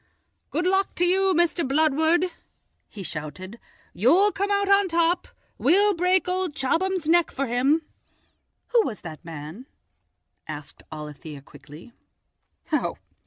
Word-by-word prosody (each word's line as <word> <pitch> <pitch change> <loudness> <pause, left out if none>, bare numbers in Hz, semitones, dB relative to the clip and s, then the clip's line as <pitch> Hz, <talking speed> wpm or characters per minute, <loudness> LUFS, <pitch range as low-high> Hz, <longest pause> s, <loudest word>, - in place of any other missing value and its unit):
"Good 350 - -1
luck 385 +1 +1
to 355 - +2
you, 380 +2 +3
Mr. 345 0 +2
Bludward," 315 +5 +2 0.6
he 200 - -9
shouted; 185 +7 -7 0.3
"you'll 340 - +4
come 400 +1 -2
out 400 0 +1
on 395 0 +4
top! 340 +1 +1 0.3
We'll 405 +3 +4
break 365 +1 +1
old 365 -4 -2
Chobham's 335 +5 0
neck 340 0 +4
for 275 - -3
him." 270 +6 +1 0.9
"Who 475 -1 +4
was 225 - -5
that 160 -1 -9
man?" 165 - -9 0.8
asked 150 -2 -8
Alethia 150 -1 -9
quickly. 150 - -14
320 Hz, 120 wpm, -24 LUFS, -, 0.9 s, you'll